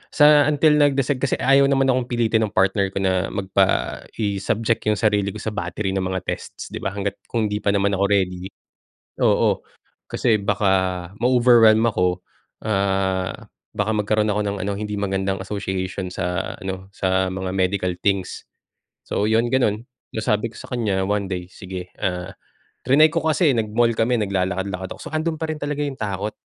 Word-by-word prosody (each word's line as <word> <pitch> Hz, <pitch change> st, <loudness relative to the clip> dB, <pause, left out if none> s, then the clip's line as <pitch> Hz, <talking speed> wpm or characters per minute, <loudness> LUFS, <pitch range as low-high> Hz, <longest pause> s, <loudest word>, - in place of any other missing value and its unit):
sa 150 Hz, -1 st, +6 dB
until 150 Hz, 0 st, +4 dB
nag-decide 140 Hz, -1 st, +2 dB
kasi 140 Hz, -, +1 dB
ayaw 135 Hz, +1 st, +4 dB
naman 135 Hz, -1 st, +3 dB
akong 125 Hz, -1 st, 0 dB
pilitin 115 Hz, -2 st, +1 dB
ng -, -, -5 dB
partner 95 Hz, +1 st, +2 dB
ko -, -, -5 dB
na 95 Hz, -1 st, +1 dB
magpa 95 Hz, -1 st, 0 dB, 0.2 s
i-subject 105 Hz, +2 st, 0 dB
yung 105 Hz, -, +3 dB
sarili 105 Hz, -2 st, +1 dB
ko -, -, -7 dB
sa 110 Hz, -, -3 dB
battery 95 Hz, +2 st, -3 dB
ng 95 Hz, -, 0 dB
mga 95 Hz, 0 st, -2 dB
tests, -, -, -6 dB
'di -, -, -5 dB
ba, 95 Hz, -, -3 dB
hangga't 100 Hz, 0 st, -3 dB
kung 110 Hz, -3 st, -1 dB
'di 105 Hz, -, 0 dB
pa 100 Hz, -1 st, +1 dB
naman 100 Hz, 0 st, +2 dB
ako 100 Hz, -, +2 dB
ready. 95 Hz, -2 st, 0 dB, 0.8 s
Oo. -, -, +3 dB, 0.5 s
Kasi 110 Hz, -4 st, +1 dB
baka 95 Hz, -3 st, 0 dB
ma-overwhelm 120 Hz, -3 st, +5 dB
ako, 90 Hz, -4 st, 0 dB, 0.4 s
ah, 95 Hz, -2 st, -1 dB, 0.3 s
baka 105 Hz, +1 st, +1 dB
magkaroon 105 Hz, 0 st, +1 dB
ako 105 Hz, -, 0 dB
ng 100 Hz, 0 st, -2 dB
ano, 100 Hz, -, -1 dB
hindi 105 Hz, 0 st, -4 dB
magandang 95 Hz, -1 st, -1 dB
association 95 Hz, -1 st, -4 dB
sa 90 Hz, -1 st, -3 dB
ano, 95 Hz, -1 st, -6 dB
sa 95 Hz, -1 st, 0 dB
mga 95 Hz, 0 st, -4 dB
medical 90 Hz, -1 st, 0 dB
things. 95 Hz, -3 st, 0 dB, 0.6 s
So, 105 Hz, -, -1 dB
'yon 115 Hz, +2 st, +2 dB
gano'n, 115 Hz, -4 st, +1 dB, 0.3 s
nasabi 110 Hz, 0 st, 0 dB
ko -, -, -19 dB
sa -, -, -11 dB
kanya 100 Hz, -6 st, 0 dB
1 100 Hz, -1 st, -1 dB
day, 90 Hz, -1 st, -3 dB
sige, 90 Hz, -1 st, -8 dB
ah, 90 Hz, +1 st, -2 dB, 0.5 s
triny 150 Hz, +4 st, +6 dB
ko 165 Hz, -, +1 dB
kasi 160 Hz, 0 st, +3 dB
nag-mall 115 Hz, +2 st, +2 dB
kami, 120 Hz, +2 st, +2 dB
naglalakad-lakad 95 Hz, -1 st, -2 dB
ako -, -, -15 dB
saka 155 Hz, -, -8 dB
andun 160 Hz, 0 st, -1 dB
pa -, -, -1 dB
rin 155 Hz, -, -4 dB
talaga 145 Hz, 0 st, -2 dB
yung 140 Hz, -2 st, -5 dB
takot. 105 Hz, 0 st, -3 dB
100 Hz, 170 wpm, -22 LUFS, 95-115 Hz, 0.8 s, sa